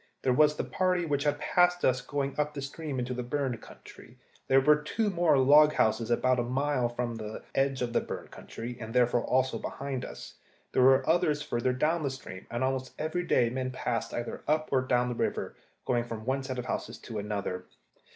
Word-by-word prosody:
There 130 - +3
was 150 +2 +4
the - - -2
party 180 -2 0
which 145 -2 -1
had 145 0 +2
passed 180 +3 +2
us 125 -1 +2
going 140 0 -2
up 150 0 0
the 140 - -4
stream 145 0 -5
into 125 0 -2
the 125 - -3
burned 125 -1 -2
country. - - -14 0.3
There 135 - +6
were 150 +2 +5
two 205 +8 -1
more 170 -5 +3
log 150 +3 +6
houses 110 -1 +1
about 125 +1 +2
a - - +1
mile 130 0 0
from 120 0 -3
the 110 -1 -7
edge 135 -1 +1
of 120 -1 -3
the - - +3
burned - - -7
country, 120 +2 -7
and 115 +1 -7
therefore 120 -1 +3
also 130 0 +1
behind 135 -2 -4
us. - - -8 0.4
There - - +2
were 130 +1 +5
others 155 -3 +2
further 125 -3 0
down 155 +6 +1
the 140 - 0
stream, 130 -8 -9
and 120 +2 -2
almost 130 0 -2
every 155 +3 -1
day 120 -2 +3
men 130 0 -2
passed 120 -2 -2
either 120 0 -4
up 155 +1 +1
or 130 -2 +3
down 125 -1 +1
the 125 - -2
river, - - -2 0.3
going 120 -1 +1
from 110 -2 -7
one 135 +2 0
set 130 -1 -5
of 125 - -4
houses - - -4
to 110 -3 -6
another. 100 -3 -3
130 Hz, 210 wpm, -29 LUFS, 120-150 Hz, 0.4 s, There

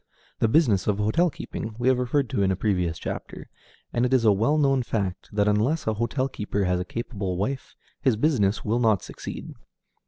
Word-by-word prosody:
The - - +3
business 110 - +3
of 105 -2 +2
hotel 110 +13 +2
keeping 110 -6 -6
we 125 +1 -1
have 130 -1 +4
referred 130 +2 +1
to - - 0
in 95 - +3
a - - +1
previous 90 -5 0
chapter, - - -6 0.5
and 120 - +1
it 125 - +1
is 120 -3 +2
a 110 - +7
well 115 +10 +2
known 135 -3 +3
fact 100 -6 -3
that 105 0 +1
unless 115 +10 +1
a 110 - +1
hotel 120 +5 -1
keeper 105 -5 -2
has 90 -1 +1
a 90 - -3
capable 100 -5 -4
wife, 130 +8 -3 0.3
his 130 -5 +3
business 110 -6 +1
will 115 +3 +1
not 110 -5 +3
succeed. - - -7
110 Hz, 205 wpm, -25 LUFS, 100-130 Hz, 0.5 s, a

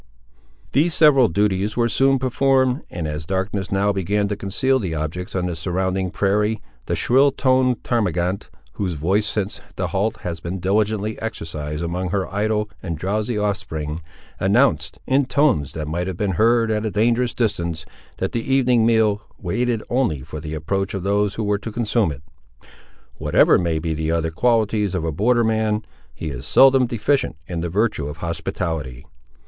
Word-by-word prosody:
These 160 +4 +2
several 140 -6 +6
duties 100 +2 0
were 120 -1 +3
soon 135 +4 +3
performed, 130 +1 +2
and, 85 -3 -4
as 75 +1 -4
darkness 95 +2 -2
now 100 +1 +2
began 100 +2 0
to 105 - -1
conceal 115 +7 0
the 90 -8 -3
objects 80 +5 -4
on 90 -1 0
the 90 -2 -2
surrounding 95 +2 -1
prairie, 105 +3 +1 0.3
the - - 0
shrill 135 +3 +4
toned 130 -2 +2
termagant, 95 -5 -1 0.2
whose 95 +2 -2
voice 95 +8 +1
since 105 -1 -3
the 90 -2 -2
halt 100 +5 -1
had 85 -3 -5
been 90 +3 -4
diligently 105 +3 0
exercised 80 -7 -4
among 90 +2 -2
her 95 +1 -1
idle 105 +1 0
and 85 -4 -4
drowsy 105 +6 -1
offspring, 80 -7 -2 0.4
announced, - - +2
in 135 0 +2
tones 130 - +2
that 75 -2 -4
might 85 +4 -2
have 95 -3 -4
been 100 0 0
heard 115 +3 +3
at 105 0 0
a 110 - -1
dangerous 115 +3 +1
distance, 85 -8 -1 0.3
that - - -2
the 115 +3 -3
evening 125 -4 +4
meal 110 -3 +3 0.2
waited 115 +4 -1
only 120 - 0
for 75 - -7
the 75 +1 -5
approach 95 +6 -2
of 95 - -4
those 100 0 +1
who 110 - -2
were 105 -1 0
to 110 +2 -6
consume 110 -4 +1
it. 70 0 -9 1.0
Whatever - - +4
may 85 -3 0
be 80 0 -2
the 80 0 -2
other 80 -1 0
qualities 105 0 +1
of 90 - -1
a 80 - -1
border 120 +9 +2
man, 110 -1 0 0.3
he 80 - -5
is - - -7
seldom 135 -2 +6
deficient 120 - 0
in 85 -1 -4
the 85 - -2
virtue 100 -5 0
of 75 +1 -7
hospitality. 80 -6 -4
100 Hz, 175 wpm, -21 LUFS, 85-115 Hz, 1.0 s, several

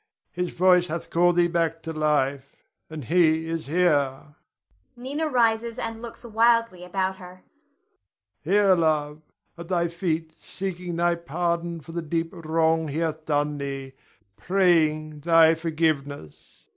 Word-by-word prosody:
His 180 0 -3
voice 180 0 +3
hath 170 +1 -5
called 175 +1 +3
thee 175 0 +4
back 165 -1 -1
to 165 - -5
life, 140 -3 -1 0.3
and 155 -2 -7
he 160 0 +2
is 165 -3 -4
here. 145 -4 0 0.6
[Nina 280 +6 -3
rises 230 -2 +1
and 225 -1 -4
looks 235 +1 -9
wildly 230 -4 +2
about 190 +1 -2
her.] 180 0 -13 1.0
Here, 195 +3 +4
love, 155 -3 0 0.4
at 170 - -8
thy 170 -2 0
feet 165 -2 -3
seeking 180 -2 -6
thy 175 +1 +2
pardon 170 0 -3
for 165 - -12
the 170 +1 -3
deep 165 +1 -2
wrong 160 -1 0
he 145 +1 -4
hath 160 -1 -2
done 145 -1 -1
thee, 135 -1 -5 0.4
praying 155 - +1
thy 165 +1 +5
forgiveness! 155 - -3
165 Hz, 135 wpm, -25 LUFS, 155-180 Hz, 1.0 s, thy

